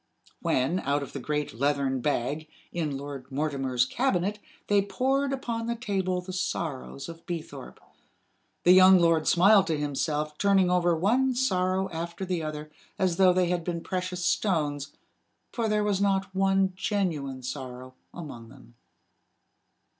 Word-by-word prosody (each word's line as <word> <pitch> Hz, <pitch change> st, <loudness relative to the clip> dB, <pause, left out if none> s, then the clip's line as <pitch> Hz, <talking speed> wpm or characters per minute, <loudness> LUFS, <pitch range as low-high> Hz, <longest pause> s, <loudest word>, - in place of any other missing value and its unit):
When, 135 Hz, +8 st, +1 dB
out 140 Hz, -1 st, 0 dB
of -, -, -9 dB
the 140 Hz, -, -4 dB
great 150 Hz, +1 st, -2 dB
leathern 140 Hz, -2 st, +1 dB
bag, 145 Hz, +3 st, -1 dB, 0.2 s
in 155 Hz, -5 st, -2 dB
Lord 140 Hz, -1 st, -8 dB
Mortimer's 135 Hz, -3 st, 0 dB
cabinet 205 Hz, -, 0 dB, 0.3 s
they 205 Hz, -1 st, +3 dB
poured 270 Hz, +7 st, 0 dB
upon 235 Hz, -4 st, -3 dB
the 235 Hz, -, -1 dB
table 190 Hz, -5 st, -1 dB
the 185 Hz, +1 st, -8 dB
sorrows 160 Hz, -7 st, -4 dB
of 165 Hz, 0 st, -10 dB
Beethorpe, 170 Hz, -3 st, -7 dB, 0.8 s
the 175 Hz, -, +6 dB
young 185 Hz, +1 st, +8 dB
lord 165 Hz, -2 st, +3 dB
smiled 195 Hz, +2 st, +5 dB
to 160 Hz, -2 st, 0 dB
himself, 150 Hz, +1 st, -2 dB
turning 195 Hz, -3 st, +3 dB
over 175 Hz, -1 st, +3 dB
one 250 Hz, +9 st, +2 dB
sorrow 190 Hz, -6 st, +1 dB
after 170 Hz, +3 st, -5 dB
the 180 Hz, -2 st, -2 dB
other, 155 Hz, -1 st, -6 dB, 0.3 s
as 185 Hz, -3 st, +1 dB
though 190 Hz, -1 st, +6 dB
they 180 Hz, -1 st, +2 dB
had 175 Hz, -1 st, -1 dB
been 170 Hz, -1 st, -3 dB
precious 180 Hz, -1 st, -3 dB
stones 145 Hz, -9 st, 0 dB, 0.6 s
for 230 Hz, -2 st, -1 dB
there 210 Hz, 0 st, +1 dB
was 200 Hz, -2 st, 0 dB
not 195 Hz, -1 st, +1 dB
one 195 Hz, 0 st, +2 dB
genuine 160 Hz, -10 st, -2 dB
sorrow 130 Hz, -1 st, -7 dB, 0.2 s
among 125 Hz, -9 st, -9 dB
them. 125 Hz, -2 st, -17 dB
175 Hz, 145 wpm, -27 LUFS, 145-195 Hz, 0.8 s, young